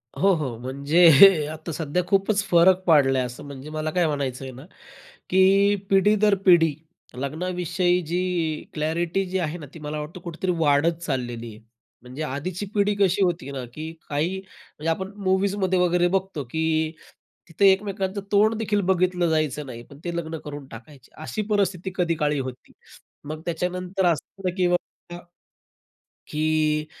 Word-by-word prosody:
हो, 195 +1 +3
हो. 135 -8 -4
म्हणजे 150 +6 +6
आता 160 +2 -7
सध्या 160 +3 -1
खूपच 200 +1 +2
फरक 180 +2 +5
पडलाय 135 -5 +4
असं. 125 0 -8
म्हणजे 140 +1 -9
मला 155 0 -3
काय 175 0 +2
म्हणायचं 140 -4 -3
आहे 130 - -7
ना, 130 +4 -12 0.6
की 195 +2 +4
पिढी 200 +2 +4
दर 210 -1 +3
पिढी 165 -5 +5 0.4
लग्नाविषयी 175 +5 -1
जी 175 +3 0 0.5
क्लॅरिटी 165 +4 -1
जी 185 +1 -2
आहे 165 -1 -2
ना, 155 - -9
ती 165 - -10
मला 150 0 -5
वाटतं 160 +4 -8
कुठेतरी 175 +2 -3
वाढत 155 +2 +3
चाललेली 120 -6 -3
आहे. 110 - -15 0.4
म्हणजे 130 +5 -6
आधीची 155 +7 -4
पिढी 205 0 +2
कशी 195 0 +3
होती 170 -6 -1
ना, 130 -2 -5
की 155 +3 -6 0.2
काही 160 +6 -1
म्हणजे 165 -4 -8
आपण 190 +4 -2
मूव्हीजमध्ये 190 0 +1
वगैरे 175 0 +3
बघतो 190 -6 -5
की, 160 0 0 0.6
तिथे 195 +4 +5
एकमेकांचं 195 0 -2
तोंड 215 +2 +4
देखील 210 -2 0
बघितलं 180 -2 +2
जायचं 155 -2 0
नाही. 120 -2 -8
पण 140 +3 -16
ते 170 -1 -3
लग्न 160 -1 -4
करून 145 -1 -7
टाकायचे. 130 +2 -14
अशी 215 - -3
परिस्थिती 190 -2 0
कधी 170 -2 +1
काळी 150 -2 0
होती. 130 -1 -7 0.5
मग 155 +1 -6
त्याच्यानंतर 180 +3 -2
असं 165 -4 +1
होतं, 185 -2 -2
की 185 -2 +2
बाबा, 175 - +3 1.6
की 155 0 +1
170 Hz, 155 wpm, -24 LUFS, 150-185 Hz, 1.6 s, म्हणजे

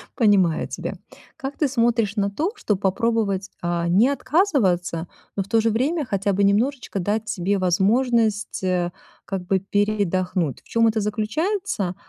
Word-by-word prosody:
Понимаю 200 - +3
тебя. - - -5 0.4
Как 270 +1 -6
ты 295 - +2
смотришь 230 -4 +1
на 200 -1 +1
то, 315 - -1
чтобы 210 - -1
попробовать, 200 -1 0
а, 170 0 -1
не 200 +9 +4
отказываться, 205 - +1 0.3
но 195 - 0
в - - -17
то 225 - +3
же 225 - +2
время 280 +7 0
хотя 200 -1 0
бы 200 +1 +1
немножечко 220 +2 +1
дать 210 +4 -1
себе 195 +3 0
возможность, 210 +3 +1
э, 180 -1 0 0.3
как 190 -2 -4
бы 190 +1 +1
передохнуть. 190 -5 0
В - - -24
чем 230 0 +3
это 220 -1 +1
заключается? 215 - -1
205 Hz, 155 wpm, -23 LUFS, 185-235 Hz, 0.4 s, не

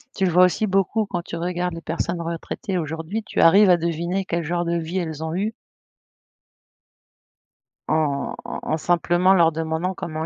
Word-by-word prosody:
tu 195 - +1
le 180 - +1
vois 180 +2 +6
aussi 180 +4 0
beaucoup 195 +3 +1
quand 175 -3 -3
tu 170 - -7
regardes 175 0 -2
les 165 - -7
personnes 170 +1 -3
retraitées 170 +4 -4
aujourd'hui, 160 +7 -4
tu - - -4
arrives 195 +4 +7
à 175 - +6
deviner 170 +3 -2
quel 170 -2 -2
genre 175 +2 -1
de 170 0 0
vie 170 +3 -3
elles 160 -2 -4
ont 160 +1 -3
eu. 210 +4 -1 2.4
En 150 -3 0
en - - -5
en 155 - -1
simplement 175 +3 +3
leur 170 -3 +5
demandant 160 +3 -2
comment 160 -2 -5
170 Hz, 175 wpm, -23 LUFS, 160-185 Hz, 2.4 s, arrives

